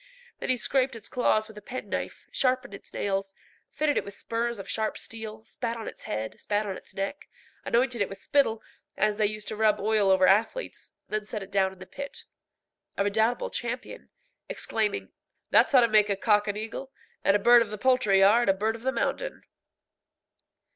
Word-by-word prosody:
Then - - -4
he 255 - +3
scraped 260 +2 +1
its 225 - -7
claws 215 -3 +1
with 215 -1 -11
a - - -19
penknife, 255 +5 -5
sharpened 255 -5 0
its 200 - -11
nails, 195 -1 -2 0.3
fitted 300 -1 0
it - - +1
with 200 0 -10
spurs 235 0 -2
of 195 - -8
sharp 220 -1 -1
steel, 220 -1 -7
spat 235 0 -4
on 225 - -6
its - - -9
head, 110 +1 -4
spat 210 +1 0
on 195 -2 -3
its - - -13
neck, 195 +9 -4 0.4
anointed 240 -1 +1
it 200 - +1
with 195 - -9
spittle, 225 -6 +1 0.3
as 210 -1 +2
they 215 -1 +3
used 215 0 -5
to - - -4
rub 215 -1 +3
oil 210 -1 +2
over 190 -1 +5
athletes; 225 - +1 0.2
then 215 0 -1
set 210 -1 -5
it 195 - -13
down 190 -1 +2
in 190 - -15
the 185 - -10
pit, 280 +7 -8 0.7
a 200 - +2
redoubtable 220 +4 +1
champion, 245 - -5 0.4
exclaiming, 215 -2 -1 0.4
"That's - - +6
how 260 -3 +7
to 235 - +5
make 215 -1 +4
a 200 - +2
cock 210 +1 +2
an 205 0 -2
eagle, 225 +5 -6 0.3
and 195 - +4
a - - +3
bird 240 +3 +7
of 230 - -1
the 210 - -5
poultry 215 -5 +3
yard 210 +3 +5
a 195 - +4
bird 220 +3 0
of 230 - -10
the 265 +2 0
mountain." - - -2
215 Hz, 200 wpm, -27 LUFS, 200-240 Hz, 0.7 s, how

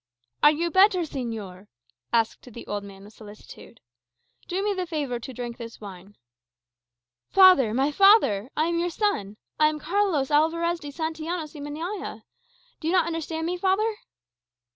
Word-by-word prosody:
_" - - -68 0.4
"Are 295 - +8
you 335 +3 -1
better, 375 0 +5
señor?" 225 - -6 0.4
asked 230 +2 -1
the 235 - -10
old 205 -1 -4
man 195 -1 -12
with 210 +2 -14
solicitude. 215 +1 -14 0.7
"Do 375 +3 -2
me 415 0 +1
the 370 -2 -3
favour 285 -7 -3
to 260 - -8
drink 240 -1 -6
this 230 -1 -9
wine." 195 -1 -11 1.1
"Father, 370 - +6
my 270 +6 +1
father! 295 - +4
I 310 - +2
am 335 0 0
your 350 +1 0
son. 260 - -2 0.2
I 305 - +6
am 305 0 -1
Carlos 325 -4 0
Alvarez 335 +3 +2
de 295 -3 -8
Santillanos 320 +1 -4
y 295 - -9
Meñaya. 300 - -6 0.6
Do 315 - -5
you 335 - +1
not 355 -3 +4
understand 325 -1 -4
me, 355 +2 -2
father?" 405 +4 +1
310 Hz, 165 wpm, -25 LUFS, 230-350 Hz, 1.1 s, Are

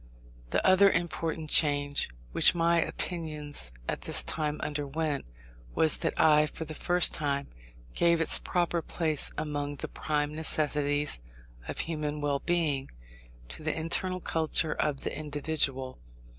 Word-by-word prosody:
The - - 0
other 190 +1 +6
important 165 -3 -3
change 145 -2 +4 0.2
which - - +5
my 170 0 +2
opinions 150 - -4 0.2
at - - -3
this - - +2
time 150 -1 -2
underwent, 145 0 -3 0.5
was 160 - +4
that - - -3
I, 150 -1 +5
for 160 - -7
the 155 - -6
first 175 +3 +3
time, 140 -2 -2 0.4
gave 170 -1 +2
its 165 - +3
proper 175 -1 -1
place, 160 -3 +1
among 145 -1 -3
the - - -6
prime 150 -1 -2
necessities 150 - +1 0.5
of - - -3
human 150 -2 -4
well 145 -1 -1
being, 155 -6 -1 0.6
to - - -7
the 155 +1 -2
internal 185 +3 +2
culture 160 -1 0
of 140 -3 -2
the - - -4
individual. 145 -3 -2
155 Hz, 135 wpm, -29 LUFS, 145-165 Hz, 0.6 s, other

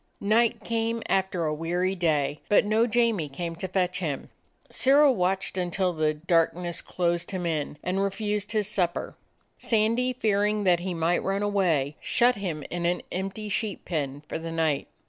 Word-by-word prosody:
Night 220 +3 +2
came 230 0 -1
after 190 -3 0
a 155 - 0
weary 175 +4 -1
day, 150 -5 0
but 205 - +5
no 220 +3 +3
Jamie 225 -9 +1
came 165 +4 -5
to 190 - -3
fetch 180 -1 0
him. 150 -7 -4 0.4
Sirrah 280 +2 +5
watched 190 -3 0
until 180 +1 0
the 155 -1 0
darkness 170 +1 0
closed 175 -1 -1
him 185 -3 -3
in, 150 -3 -2
and 185 +2 0
refused 205 +1 -2
his 210 -2 0
sup 180 -5 0
per. - - -5 0.5
Sandy, 230 +3 +1
fearing 210 -3 +1
that 180 -3 +4
he 180 0 -3
might 165 +2 +1
run 195 +1 -1
away, 170 -9 +1
shut 245 -1 +3
him 170 -7 -4
in 170 0 -1
an 175 +1 -1
empty 195 +3 -4
sheep 210 0 -2
pen 145 -4 -3
for - - -4
the 165 0 -6
night. 160 -3 0
185 Hz, 170 wpm, -26 LUFS, 165-210 Hz, 0.5 s, but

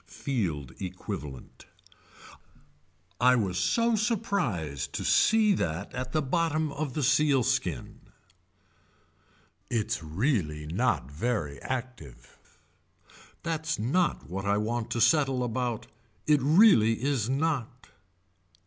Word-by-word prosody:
Field 85 - -3
equivalent. 90 - -7 1.5
I 125 +1 +5
was 95 -6 0
so 230 - +2
surprised 120 - -1
to - - -3
see 220 -2 +4
that 90 - -3
at 130 0 -4
the 155 +1 0
bottom 155 +1 0
of 140 -3 -4
the 150 - -1
sealskin. 130 - +1 1.7
Its 115 -7 -1
really 80 - -1
not 80 - -1
very 75 - -2
active. 115 - -6 1.1
That's 160 -1 -2
not 135 - 0
what 95 +4 -5
I 100 0 +2
want 115 +2 -2
to 120 -1 -1
settle 130 +1 +3
about. 120 -1 -2 0.4
It 150 -1 +4
really 150 - +6
is 135 -5 0
not. 135 -4 -2
120 Hz, 105 wpm, -28 LUFS, 90-150 Hz, 1.7 s, really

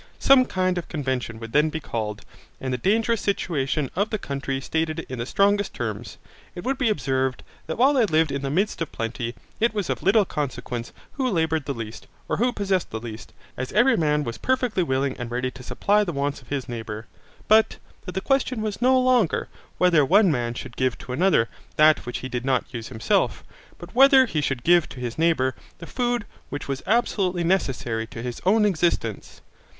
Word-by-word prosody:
Some 270 -2 +6
kind 185 -3 0
of 170 - -8
convention 130 -6 -3
would 115 -1 -8
then 150 +2 +4
be 160 - -4
called, 110 -7 -4 0.4
and 130 -1 -3
the - - 0
dangerous 225 - +1
situation 150 -7 -1
of 200 +4 +1
the 215 - -1
country 135 -5 -3
stated 160 +3 -2
in 130 -2 -6
the 120 - -3
strongest 205 +2 +2
terms. 110 -3 -5 0.4
It 175 - -6
would 265 +2 -1
be 250 -5 +2
observed, 130 -9 -1 0.2
that 160 - -3
while 265 +5 +5
they 250 -6 +3
lived 160 -3 +2
in 140 - -2
the 135 - -2
midst 190 +6 0
of 165 - -2
plenty, 115 +1 -4 0.2
it 225 0 +2
was 205 -4 -1
of - - -3
little 205 +1 +4
consequence 125 -6 -4 0.2
who 265 -3 -1
laboured 160 - 0
the 140 - -3
least, 115 -1 -7 0.2
or - - -1
who 245 +3 +2
possessed 195 -5 -1
the 110 - -4
least, 115 -1 -8 0.2
as 130 0 -4
every 255 +1 +5
man 150 -4 +1
was 115 -4 -5
perfectly 250 -6 +1
willing 135 -4 0
and 120 -1 -4
ready 125 +1 -2
to 125 - -12
supply 205 +10 +1
the 180 - -3
wants 140 -1 -2
of 125 - -20
his 140 -1 -3
neighbour. 110 -2 -6 0.4
But 220 +1 +4 0.3
that 180 - -5
the 190 - -1
question 255 -2 0
was 215 0 -4
no 260 +1 +5
longer 250 -8 +2 0.3
whether 175 -4 +4
one 190 +6 +5
man 120 -4 -1
should 125 0 -8
give 130 -2 0
to 125 - -7
another 155 -6 +3 0.3
that 155 -4 +4
which 120 - -4
he - - -2
did 125 -1 -4
not 130 -1 0
use 115 -2 -5
himself, 110 -3 0 0.3
but 175 +1 -11
whether 265 +1 +7
he 155 -10 -1
should 135 -3 -2
give 175 -1 +4
to 130 - -10
his 120 +2 -5
neighbour 160 -6 +2 0.2
the 170 - -9
food 240 +2 -1 0.2
which 145 0 -5
was 135 -1 -3
absolutely 195 -5 +1
necessary 125 -10 0
to 115 +1 -8
his 125 -1 -5
own 210 +2 +5
existence. 170 - -1
155 Hz, 205 wpm, -24 LUFS, 125-205 Hz, 0.4 s, whether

